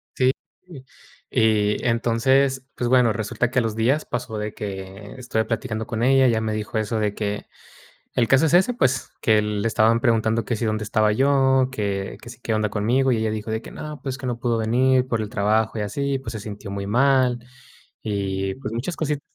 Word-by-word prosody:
Sí, 130 0 +3 0.3
sí, 145 -8 -12 0.4
y 105 -2 +2
entonces, 130 +3 +2
pues 120 - -2
bueno, 125 -3 +4
resulta 115 +3 -2
que 125 - +2
a - - +2
los 110 -2 -2
días 130 +7 +1
pasó 115 -3 -4
de 105 0 -4
que 95 0 -7
estuve 120 -3 -1
platicando 110 -1 -3
con 115 0 -2
ella. 135 +1 +5
Ella 115 -3 +2
me 110 -1 -2
dijo 110 +1 -3
eso 110 +1 -1
de 105 -1 0
que 105 -1 -3 0.7
el 120 -2 +2
caso 135 +4 +5
es 160 - +1
ese, 190 +7 +4
pues, 130 - 0
que 110 -1 +4
le 105 0 -2
estaban 115 +1 +3
preguntando 115 -2 +1
que 115 - -2
si 115 - -3
dónde 110 -1 -1
estaba 110 0 +2
yo, 135 +1 +3
que 100 -5 -3
que 120 - -12
si, 120 0 -11
qué 115 - -2
onda 110 -1 +1
conmigo, 125 +6 +1
y, 115 - +1
ella 110 0 0
dijo 110 +1 -4
de 110 +1 -2
que: - - -10
"No, 150 -1 -8
pues 135 -1 -4
que 130 - -6
no 120 -2 -2
pudo 120 -1 0
venir 125 +3 +2
por 115 -3 -1
el 110 - -3
trabajo 110 +2 +1
y - - -1
así, 135 +7 -2
pues, 125 -4 -7
se 110 - -6
sintió 105 -1 -8
muy 100 0 -4
mal 130 +2 +3 0.7
y 95 -2 -2
pues 130 -5 -6
muchas 135 +9 -3
cosit" 150 -2 -1
115 Hz, 215 wpm, -23 LUFS, 110-130 Hz, 0.7 s, ella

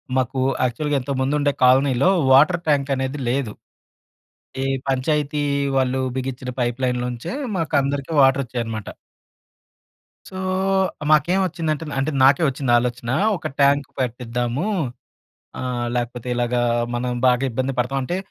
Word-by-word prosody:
మాకూ 130 +1 0 0.2
యాక్చువల్‌గా 145 +4 -1
ఇంతకు 135 +1 -3
ముందు 135 +3 +1
ఉండే 145 0 +2
కాలనీలో 130 +3 +4 0.2
వాటర్ 155 +6 +5
ట్యాంక్ 140 -2 +2
అనేది 130 +2 -3
లేదు. 125 -4 -1 1.1
ఈ - - 0 0.2
పంచాయతీ 145 +2 0 0.3
వాళ్ళు 130 0 +1 0.2
బిగిచ్చిన 130 -1 -4
పైప్ 120 +1 -1
లైన్‌లోంచే 125 - -2 0.2
మాకందరికి 145 -2 -1
వాటర్ 135 +1 +4
ఒచ్చేయి 120 0 -3
అనమాట. 110 -3 -6 1.4
సో 190 - -12 0.8
మాకేం 170 +6 +3
వచ్చిందంటే 160 -3 -2 0.2
అంటే 150 +4 0
నాకే 140 +5 +5
వచ్చింది 130 -2 -2
ఆలోచన 120 -1 -3 0.3
ఒక - - -4
ట్యాంక్ 140 0 +3
పెట్టిద్దాము. 125 - -2 0.9
ఆహ్, 120 -1 -2
లేకపోతే 120 0 -3
ఇలాగా 120 0 0 0.3
మనం 125 +1 -2 0.2
బాగా 125 +1 +3
ఇబ్బంది 130 +3 -2
పడతాం. 135 +3 0
అంటే 175 +7 -2
130 Hz, 125 wpm, -21 LUFS, 125-145 Hz, 1.4 s, వాటర్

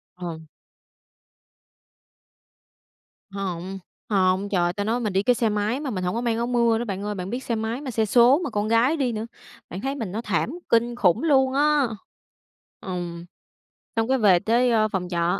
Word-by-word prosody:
Ờ. 170 -3 -6 2.9
Hông. 190 -1 -5 0.3
Hông, 190 0 +2
trời 185 -3 +1
ơi, 175 - 0
ta 205 - -3
nói 230 +4 0
mình 215 -5 -2
đi 195 - +2
cái 245 +3 +3
xe 225 -2 +1
máy 210 +4 -1
mà 290 -2 -4
mình 185 -5 -3
hổng 180 +4 -1
có 235 - -1
mang 235 -2 0
áo 235 +1 -1
mưa 235 -2 +2
nữa 240 - -3
bạn 200 -1 -4
ơi, 210 0 -3
bạn 185 -1 -5
biết 245 +4 -4
xe 235 - -2
máy 225 +4 -3
mà 270 - -5
xe 220 -1 +1
số 245 +6 +5
mà 285 - -2
con 210 -1 -1
gái 235 +8 +3
đi 265 -4 0
nữa. 220 0 -4 0.4
Bạn 185 - -6
thấy 270 +2 -2
mình 225 -9 -4
nó 215 +4 -3
thảm 240 - -1 0.2
kinh 235 +1 +2
khủng 210 - +2
luôn 265 -4 +3
á. 290 -1 +3 0.9
Ừm, 175 -2 -5 0.7
xong 225 0 +1
cái 265 - +3
về 195 -6 +5
tới, 235 +5 +2
a, 215 -2 +3
phòng 190 -4 -3
trọ 170 0 0
220 Hz, 200 wpm, -24 LUFS, 190-245 Hz, 2.9 s, số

